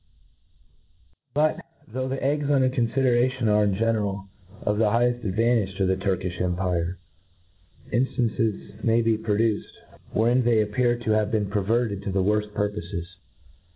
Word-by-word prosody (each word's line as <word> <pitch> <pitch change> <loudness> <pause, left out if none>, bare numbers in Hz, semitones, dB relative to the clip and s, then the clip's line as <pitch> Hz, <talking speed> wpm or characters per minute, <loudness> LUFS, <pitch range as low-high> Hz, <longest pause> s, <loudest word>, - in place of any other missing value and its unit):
But, 155 +1 +2 0.3
though 130 +3 -3
the 135 +1 -3
eggs 145 +1 0
under 135 -3 +3
confideration 125 0 +1
are 105 0 +4
in 100 -2 +1
general 105 -3 -1 0.3
ef 105 0 0
the 115 - +4
higheft 120 +2 +1
advantage 105 -1 +1
to 95 - +1
the 95 0 +2
Turk* 95 -1 -1
iQx 90 -2 -4
empire, 90 -1 -1 1.0
inftancts 110 -3 -1
may 115 0 +3
be 115 0 +3
produced, 110 0 -1 0.4
wherein 120 +3 +2
they 115 -2 +3
appear 120 +3 +1
to 120 -2 -2
have 110 -1 +2
been 105 -3 -1
perverted 105 0 0
to 100 - -4
the 95 0 +1
worft 105 +1 0
purpofes. 100 -4 -3
110 Hz, 145 wpm, -25 LUFS, 100-120 Hz, 1.0 s, are